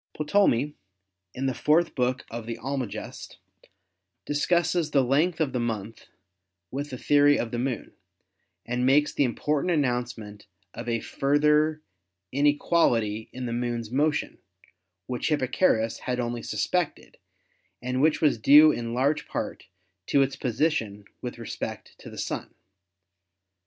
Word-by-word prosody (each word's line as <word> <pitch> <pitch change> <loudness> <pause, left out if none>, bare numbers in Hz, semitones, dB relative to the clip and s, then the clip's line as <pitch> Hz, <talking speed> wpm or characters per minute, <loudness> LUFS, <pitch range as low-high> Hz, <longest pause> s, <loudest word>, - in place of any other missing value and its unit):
Ptolemy, 150 - +2 0.6
in 130 - -3
the 130 - +1
fourth 160 +6 +2
book 125 0 -1
of 115 -1 -6
the 115 - -4
"Almagest," 135 -5 -5 0.9
discusses 170 +2 +1
the 140 -3 +3
length 155 +7 +1
of 150 -5 0
the 125 - 0
month 115 -2 -4 0.6
with 145 +2 -4
the 130 - -6
theory 145 +2 +4
of 115 - -3
the 120 - -2
Moon 125 -2 -3 0.7
and 120 +1 -2
makes 140 +3 +3
the - - +2
important 145 +5 0
announcement 120 -8 -2 0.3
of - - -6
a 115 -1 0
further 150 +2 +2 0.5
inequal 145 0 +3
ity 110 0 -4
in 130 0 -6
the 120 - -3
Moon's 120 -2 -3
motion, 150 +3 0 0.7
which 125 +1 -3
Hipparchus 130 -5 +1
had 125 -1 -3
only 120 -1 -2
suspected 180 +4 -2 0.6
and 125 +1 -2
which 155 +1 +3
was 145 -7 +3
due 150 +6 +8
in 115 -3 -4
large 145 +4 +1
part - - -5 0.4
to 140 - +4
its 135 0 -2
position 110 -6 -1 0.2
with 125 -1 -6
respect 115 -2 -6
to - - -10
the - - -11
Sun. - - -4
130 Hz, 135 wpm, -26 LUFS, 120-150 Hz, 0.9 s, due